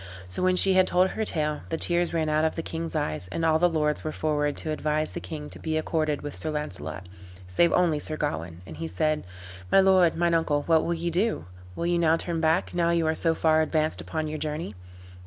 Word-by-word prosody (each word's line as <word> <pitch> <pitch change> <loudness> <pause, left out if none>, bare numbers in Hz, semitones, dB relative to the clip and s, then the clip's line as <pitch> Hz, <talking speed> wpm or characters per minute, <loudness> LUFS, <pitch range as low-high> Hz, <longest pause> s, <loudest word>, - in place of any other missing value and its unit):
So 90 - -4
when 185 0 +3
she 190 +1 +5
had 185 0 +4
told 180 +1 +3
her 220 - -3
tale, 150 -6 -2
the 165 - -1
tears 175 +1 +1
ran 160 -2 0
out 155 0 +2
of 160 - +1
the 165 - -3
king's 165 0 -5
eyes; 90 - -1
and 165 - -2
all 160 -1 +3
the 175 +1 +4
lords 150 -2 0
were 155 - -3
forward 150 -2 -1
to 155 - -3
advise 155 0 -1
the - - -5
king 150 -2 -7
to - - -8
be 160 -1 -2
accorded 155 -2 -1
with 145 -1 -6
Sir 155 - -1
Launcelot, 95 - -5 0.4
save 130 - +3
only 170 -4 +2
Sir 155 +1 -2
Gawain; 85 - -4
and 80 -2 -10
he 80 0 -4
said, 150 - 0 0.5
"My - - +6
lord, 190 -3 +5
mine 170 0 +2
uncle, 150 -3 +1
what 160 0 +3
will 170 - -1
ye 170 +1 -2
do? 205 +7 0 0.3
Will 170 - -3
you 175 0 +1
now 165 -1 +3
turn 165 -1 -3
back, 160 0 +1
now 170 -1 +1
you 170 -1 +2
are 160 - +2
so 165 0 +1
far 160 -1 +3
advanced 155 0 0
upon 155 -1 -3
your 155 0 -4
journey? 150 -5 -4
160 Hz, 235 wpm, -26 LUFS, 150-170 Hz, 0.5 s, My